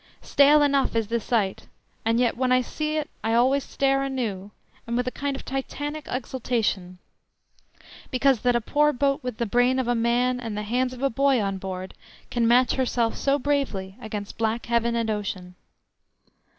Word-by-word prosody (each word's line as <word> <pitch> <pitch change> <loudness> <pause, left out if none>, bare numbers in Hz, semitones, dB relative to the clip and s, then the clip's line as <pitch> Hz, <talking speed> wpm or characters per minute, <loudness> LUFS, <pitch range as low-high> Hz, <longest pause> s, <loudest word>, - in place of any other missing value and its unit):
Stale 290 +1 +5
enough 280 -4 +2
is 225 -2 0
the 235 0 +1
sight, 210 -4 -1 0.4
and 230 +1 +2
yet 245 -2 +2
when 255 +1 0
I 255 0 +5
see 305 +5 -3
it 300 -1 -2 0.2
I 225 +1 +1
always 260 +4 +3
stare 275 0 +1
anew, 230 -8 -3 0.4
and 235 +1 -1
with 250 - 0
a - - 0
kind 280 +1 -3
of - - -8
Titanic 290 +3 -4
exultation, 230 -7 -2 1.1
because 260 -1 +2
that 245 +1 +2
a 240 - +2
poor 300 +5 +2
boat 275 +2 +1
with 250 -3 -5
the 235 - -1
brain 245 +4 +2
of 260 -2 -1
a 245 - +2
man 240 +2 +1
and 225 -4 -5
the 210 - -2
hands 250 +4 0
of 255 +1 -8
a 275 - +2
boy 275 +1 +3
on 195 -2 -2
board 185 0 -6 0.4
can 235 -2 +1
match 250 +2 +4
herself 240 -3 0
so 275 0 +1
bravely 255 -10 -1
against 210 -1 -6
black 225 +1 0
heaven 235 0 +1
and 230 -1 0
ocean. 195 -4 -4
245 Hz, 185 wpm, -25 LUFS, 225-270 Hz, 1.1 s, Stale